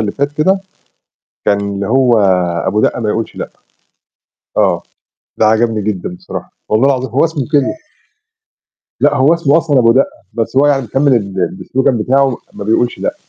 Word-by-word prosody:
اللي 105 -2 -1
فات 140 +1 -2
كده، 190 +6 +1 0.8
كان 100 - +2
اللي 100 0 -3
هو 125 -1 +3 0.5
أبو 105 +3 +1
دقة 120 - 0
ما 110 - -2
يقولش 110 +1 -3
لأ. - - -5 1.1
آه. - - +2 0.6
ده 110 - +4
عجبني 110 -1 +2
جدًا 95 -4 -3
بصراحة. - - -8 0.2
والله 110 +5 +3
العظيم. 130 -2 0
هو 135 +6 +2
اسمه 160 -4 -2
كده. 145 - +2 1.3
لأ، - - +3
هو 145 +6 +4
اسمه 160 -2 +2
أصلًا 150 -5 +1
أبو 115 -1 +5
دقة. 135 +2 +2 0.2
بس 115 +3 -3
هو 140 - +5
يعني 140 -2 +2
مكمل 135 +4 +1
ال 100 -4 -4
ال 95 +2 -4
الslogan 135 +1 +1
بتاعه 130 +2 +1 0.2
ما - - -7
بيقولش 115 +3 0
لأ. 285 - -2
125 Hz, 170 wpm, -14 LUFS, 110-140 Hz, 1.3 s, أبو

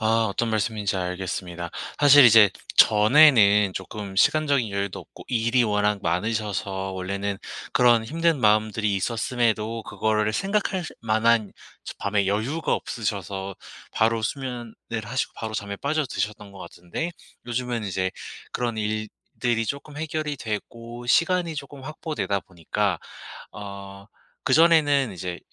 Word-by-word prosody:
아 115 0 +2
어떤 115 +3 -1
말씀인지 105 -2 -1
알겠습니다. 90 -1 -4 0.3
사실 145 -1 +8
이제 110 -3 +8 0.3
전에는 105 -4 +6
쪼끔 95 +1 -6
시간적인 140 -5 +3
여유도 100 -1 -3
없고 - - -14
일이 120 +1 +2
워낙 105 -1 +1
많으셔서 95 +1 -2
원래는 100 +2 -3 0.3
그런 120 -1 +4
힘든 165 +1 0
마음들이 105 -1 +2
있었음에도 115 +1 -1
그거를 105 +1 0
생각할 195 - -1 0.2
만한 110 -1 +2 0.3
저 - - -7
밤에 100 -1 0
여유가 115 +11 0
없으셔서 100 -3 -4 0.4
바로 110 0 +1
수면을 125 -2 -4 0.3
하시고 130 +5 -2
바로 110 -1 -5
잠에 100 -1 -4
빠져 150 +4 -1
드셨던 105 -3 -4
것 95 - -12
같은데 90 - -6 0.4
요즘은 120 -2 -2
이제 95 -1 -1 0.4
그런 120 -2 -2
일들이 110 +2 -2
쪼끔 145 +1 -5
해결이 155 -1 -3
되고 115 +2 -6
시간이 170 +3 +2
쪼끔 140 -1 -8
확보되다 120 - -3
보니까 85 -4 -2 0.5
어 100 0 -9 0.4
그전에는 145 - +4
이제 90 0 -5
110 Hz, 305 characters per minute, -24 LUFS, 100-125 Hz, 0.5 s, 사실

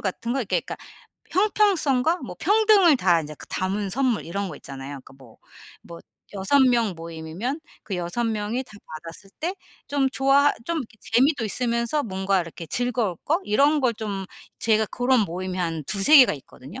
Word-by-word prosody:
같은 225 +5 -3
거 270 - -1
이렇게 235 -7 0
그러니까 - - -7 0.5
형평성과 360 -7 +2
뭐 - - -8
평등을 415 -7 +5
다 175 -8 +3
이제 150 0 -8
그 - - -11
담은 195 +1 -2
선물 255 -1 0
이런 195 +3 -3
거 150 - -8
있잖아요. 135 -1 -9 0.2
그러니까 - - -15
뭐, 120 -4 -17 0.5
뭐 170 -1 -11 0.3
6 195 +9 +2
명 235 -6 +3
모임이면 165 - -5 0.2
그 195 - -4
6 180 +7 -2
명이 220 +2 -2
다 215 - -18 0.3
받았을 170 +4 -11
때 345 +3 -2 0.3
좀 280 -2 +1
좋아 275 +2 +4
좀 335 +3 -1
이렇게 235 -5 -8
재미도 250 +2 +2
있으면서 235 +5 -1
뭔가 190 -3 0
이렇게 165 0 -8
즐거울 235 -2 -1
거 325 +6 +2
이런 285 +8 +3
걸 250 -3 +2
좀 205 -3 -4 0.3
제가 220 -1 +2
고런 250 0 +2
모임이 185 0 -3
한 165 -4 -2
2-3 205 - +4
개가 255 - +7
있거든요. 140 - -12
225 Hz, 330 characters per minute, -24 LUFS, 185-270 Hz, 0.5 s, 개가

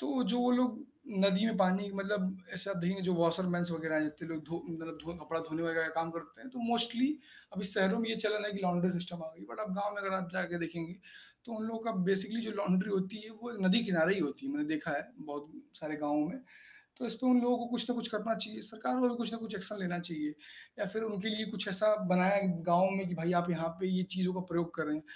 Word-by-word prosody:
तो 270 -3 0
जो 245 - +1
वो 245 - +3
लोग 250 +1 +1 0.4
नदी 200 +1 +3
में 225 -2 0
पानी 195 +1 +2
मतलब 195 -1 -2 0.2
ऐसा 195 +2 +1
देंगे 185 +3 -1
जो 185 - +2
वॉशर 170 +2 +3
मैन्स 175 0 +1
वग़ैरह 160 -1 -1
इतने 150 +2 -8
लोग 160 -1 -5
धो 170 +1 -5
मतलब 165 -1 -8
धो 170 +1 -7
कपड़ा 165 +2 -3
धोने 160 0 -4
वग़ैरह 165 0 0
का 160 +1 -2
काम 165 0 -3
करते 165 - -15
हैं 265 - -12
तो 255 - -10
मोस्टली 235 +2 +6 0.5
अभी 200 +1 -3
शहरों 195 +2 +3
में 225 0 -1
ये 225 - -1
चल 215 -1 +3
रहा 210 0 -1
है 210 - -4
कि 200 - -5
लॉन्डरी 180 0 +1
सिस्टम 175 -1 -6
आ 160 - -7
गई। - - -14
बट - - -8
आप 215 - -4
गाँव 205 0 -1
में 200 - -5
अगर 190 -1 -1
आप 185 -1 -4
जाके 175 -2 -2
देखेंगे 170 +1 -7 0.5
तो 235 - -10
उन 220 - -4
लोगों 225 0 -5
का 230 - -1 0.2
बेसिकली 210 +4 +2
जो 220 -1 -5
लॉन्ड्री 185 +2 +1
होती 195 +2 -2
है 220 - -12
वो 240 -1 -7
नदी 215 +5 +5
की 200 - -3
नारे 165 +2 +4
ही 195 - -2
होती 150 - -3
है, 275 - -3
मैंने 295 +1 -1
देखा 305 - -2
है 145 0 -3
बहुत 145 0 -8
उम, 285 - -14
सारे 155 -1 -6
गाँवों 150 0 0
में। 265 - -8 0.6
तो 250 - -4
इसपे 230 +2 +3
उन 250 -1 +6
लोगों 245 0 +2
को 235 - -4
कुछ 235 0 +2
न - - +1
कुछ 230 -1 +1
करना 220 0 -1
चाहिए। 220 0 -1
सरकार 220 +3 -1
को 250 - +4
भी 240 - -2
कुछ 230 -2 0
न - - -3
कुछ 225 -1 -7
एक्शन 195 +1 +1
लेना 175 -1 -2
चाहिए। 165 -4 -3 0.5
या 205 - -1
फिर 220 +3 -3
उनके 215 -1 -3
लिए 220 0 -1
कुछ 210 -1 +1
ऐसा 215 +2 +5 0.2
बनाया 185 +2 +4 0.3
गाँव 180 +2 +5
में 195 -1 -2
कि 175 - -4
भाई 170 +1 -1
आप 175 - -4
यहाँ 165 -1 -1
पे 185 - -1
ये 185 0 +1
चीज़ों 185 0 0
का 185 - -3
प्रयोग 170 0 -1
कर 160 - -2
रहे 150 0 -1
हैं 155 - -7
195 Hz, 265 wpm, -32 LUFS, 170-225 Hz, 0.6 s, मोस्टली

